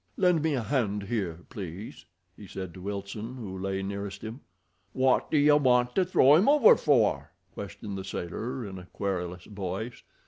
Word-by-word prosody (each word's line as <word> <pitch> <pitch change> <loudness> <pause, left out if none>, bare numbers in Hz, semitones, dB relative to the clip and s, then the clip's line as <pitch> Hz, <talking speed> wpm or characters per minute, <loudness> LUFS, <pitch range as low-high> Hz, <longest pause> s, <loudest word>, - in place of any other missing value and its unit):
"Lend 180 -4 +3
me 155 -2 +1
a 125 - -1
hand 105 -6 0
here, 95 -6 -3
please," 95 -2 -8 0.3
he 105 - -12
said 95 -3 -6
to 95 - -11
Wilson, 100 +4 -5
who 105 -7 -7
lay 95 +1 -3
nearest 100 +1 -5
him. 115 +5 -7 0.5
"Wot 130 0 +2
do 155 - +2
you 145 0 +6
want 125 -3 +3
to 190 - +3
throw 150 -6 +5
'im 190 - +4
over 290 -6 +7
for?" 105 - +2 0.2
questioned 100 +1 -7
the - - -5
sailor, 115 +9 -4
in 95 -2 -7
a 90 - -12
querulous 90 -2 -3
voice. 100 +3 -5
105 Hz, 175 wpm, -28 LUFS, 95-130 Hz, 0.5 s, over